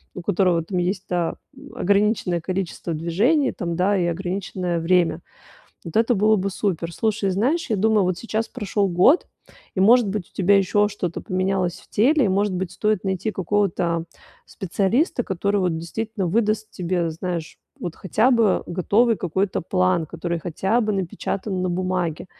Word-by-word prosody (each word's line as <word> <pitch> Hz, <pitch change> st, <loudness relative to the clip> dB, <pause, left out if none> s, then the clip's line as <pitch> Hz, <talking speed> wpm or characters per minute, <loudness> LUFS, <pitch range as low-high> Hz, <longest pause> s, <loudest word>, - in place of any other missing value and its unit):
у 180 Hz, -, -5 dB
которого 180 Hz, -3 st, +2 dB
там 180 Hz, +2 st, -2 dB
есть 185 Hz, +2 st, -1 dB
та 175 Hz, -2 st, -1 dB, 0.2 s
м, 280 Hz, +1 st, -13 dB
ограниченное 200 Hz, -3 st, +1 dB
количество 180 Hz, -1 st, -3 dB
движений 215 Hz, -, +2 dB
там, 170 Hz, -2 st, -4 dB
да, 190 Hz, +4 st, +2 dB
и 175 Hz, -, +1 dB
ограниченное 180 Hz, 0 st, -2 dB
время. 170 Hz, -1 st, +2 dB, 0.6 s
Вот 165 Hz, -, -8 dB
это 230 Hz, +2 st, +3 dB
было 215 Hz, +2 st, +4 dB
бы 195 Hz, +1 st, -1 dB
супер. 175 Hz, -4 st, -2 dB
Слушай, 215 Hz, -1 st, 0 dB
знаешь, 260 Hz, -, 0 dB
я 215 Hz, -, +2 dB
думаю, 215 Hz, +1 st, +3 dB
вот 180 Hz, -1 st, -1 dB
сейчас 225 Hz, 0 st, -2 dB
прошёл 205 Hz, -4 st, -1 dB
год 185 Hz, -, +4 dB, 0.5 s
и, 190 Hz, -, +1 dB
может 230 Hz, +2 st, +5 dB
быть, 195 Hz, -2 st, -3 dB
у -, -, -33 dB
тебя 200 Hz, +1 st, +4 dB
ещё 205 Hz, +2 st, +2 dB
что-то 180 Hz, -5 st, -4 dB
поменялось 185 Hz, -1 st, -1 dB
в -, -, -22 dB
теле, 270 Hz, +5 st, +3 dB
и, -, -, +2 dB
может 200 Hz, +1 st, +1 dB
быть, 180 Hz, -1 st, -3 dB
стоит 210 Hz, -2 st, 0 dB
найти 190 Hz, +2 st, -1 dB
какого-то 180 Hz, -4 st, 0 dB, 0.4 s
специалиста, 200 Hz, -, 0 dB
который 200 Hz, 0 st, -1 dB
вот 180 Hz, -3 st, 0 dB
действительно 210 Hz, +4 st, -4 dB
выдаст 215 Hz, +3 st, 0 dB
тебе, 175 Hz, -2 st, -1 dB
знаешь, 170 Hz, 0 st, -5 dB, 0.2 s
вот 175 Hz, -2 st, -5 dB
хотя 220 Hz, +7 st, +1 dB
бы 225 Hz, -5 st, +2 dB
готовый 210 Hz, +6 st, +2 dB
какой-то 190 Hz, +3 st, -1 dB
план, 185 Hz, -2 st, +1 dB
который 170 Hz, +2 st, -4 dB
хотя 190 Hz, +8 st, 0 dB
бы 215 Hz, -2 st, 0 dB
напечатан 190 Hz, 0 st, -3 dB
на 185 Hz, -, 0 dB
бумаге. 180 Hz, -2 st, -2 dB
190 Hz, 165 wpm, -22 LUFS, 175-210 Hz, 0.6 s, может